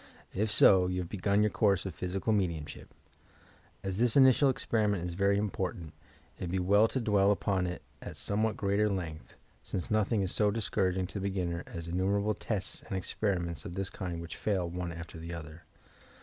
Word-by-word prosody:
If 105 Hz, +2 st, +5 dB
eo, 95 Hz, -2 st, +6 dB
you 90 Hz, 0 st, -1 dB
have 85 Hz, -, -7 dB
begun 100 Hz, +1 st, +1 dB
your 105 Hz, -, +2 dB
course 100 Hz, -3 st, +2 dB
of 95 Hz, -, -4 dB
physical 95 Hz, +5 st, -2 dB
raediumship! 85 Hz, -7 st, -2 dB, 1.0 s
As 95 Hz, 0 st, -3 dB
this 120 Hz, -1 st, +3 dB
initial 135 Hz, +1 st, +6 dB
experi 110 Hz, -4 st, 0 dB
ment 100 Hz, -4 st, -1 dB
is 90 Hz, -1 st, -4 dB
very 100 Hz, +2 st, +2 dB
important, 95 Hz, -5 st, -3 dB, 0.5 s
it -, -, -3 dB
would -, -, -4 dB
be 95 Hz, -, -1 dB
well 100 Hz, +4 st, +4 dB
to 130 Hz, -, -2 dB
dwell 105 Hz, -4 st, +3 dB
upon 95 Hz, -2 st, +1 dB
it 90 Hz, -, -6 dB, 0.2 s
at -, -, -8 dB
somewhat 110 Hz, +2 st, -1 dB
greater 100 Hz, +1 st, +1 dB
length, 85 Hz, -5 st, -5 dB, 0.3 s
since 90 Hz, +1 st, -4 dB
nothing 110 Hz, -1 st, +2 dB
is 95 Hz, -, -1 dB
so 105 Hz, -1 st, +2 dB
dis 110 Hz, +1 st, -3 dB
couraging 95 Hz, -1 st, +1 dB
to 100 Hz, -, -5 dB
the 100 Hz, +1 st, -1 dB
beginner 90 Hz, -3 st, -2 dB
as 85 Hz, -1 st, -7 dB
innumerable 100 Hz, +4 st, 0 dB
tests 100 Hz, -3 st, -3 dB
and 95 Hz, -, -5 dB
experiments 90 Hz, -4 st, -2 dB
of 85 Hz, -, -7 dB
this 95 Hz, 0 st, -3 dB
kind 85 Hz, -3 st, -5 dB
which 85 Hz, -, -8 dB
fail 95 Hz, -5 st, -1 dB
one 85 Hz, 0 st, -4 dB
after 85 Hz, 0 st, -8 dB
the 85 Hz, +1 st, -6 dB
other. 80 Hz, 0 st, -10 dB
95 Hz, 195 wpm, -30 LUFS, 90-105 Hz, 1.0 s, eo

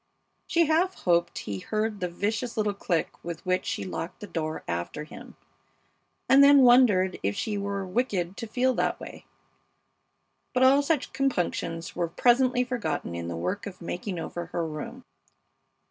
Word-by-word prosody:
She 340 Hz, -2 st, +3 dB
half 335 Hz, +5 st, +2 dB
hoped 170 Hz, -1 st, +2 dB
he 100 Hz, -2 st, -4 dB
heard 215 Hz, -, -2 dB
the 180 Hz, -, -2 dB
vicious 215 Hz, +7 st, -2 dB
little 210 Hz, -1 st, +1 dB
click 175 Hz, -5 st, -2 dB
with 170 Hz, +1 st, -6 dB
which 185 Hz, 0 st, 0 dB
she -, -, -2 dB
locked 180 Hz, -2 st, -5 dB
the -, -, -7 dB
door 160 Hz, -5 st, -4 dB
after 85 Hz, -, -3 dB
him, 155 Hz, -, -12 dB, 0.9 s
and 270 Hz, +2 st, +7 dB
then 280 Hz, -1 st, +8 dB
wondered 230 Hz, -7 st, +5 dB
if 100 Hz, +1 st, -1 dB
she 215 Hz, -, -2 dB
were 200 Hz, -1 st, -2 dB
wicked 185 Hz, -3 st, -1 dB
to 230 Hz, -, -5 dB
feel 255 Hz, +4 st, +1 dB
that -, -, 0 dB
way. -, -, -10 dB, 1.3 s
But 255 Hz, -, +4 dB
all 270 Hz, +2 st, +6 dB
such 290 Hz, -1 st, -1 dB
compunctions 175 Hz, -9 st, -1 dB
were 175 Hz, -1 st, 0 dB
presently 250 Hz, +7 st, +3 dB
forgotten 235 Hz, -, -3 dB
in 85 Hz, 0 st, -4 dB
the 85 Hz, -1 st, -4 dB
work 90 Hz, -, -3 dB
of 195 Hz, -, -9 dB
making 180 Hz, +2 st, -4 dB
over 170 Hz, +1 st, -5 dB
her 170 Hz, -1 st, -2 dB
room. 155 Hz, -1 st, -7 dB
200 Hz, 160 wpm, -27 LUFS, 170-250 Hz, 1.3 s, then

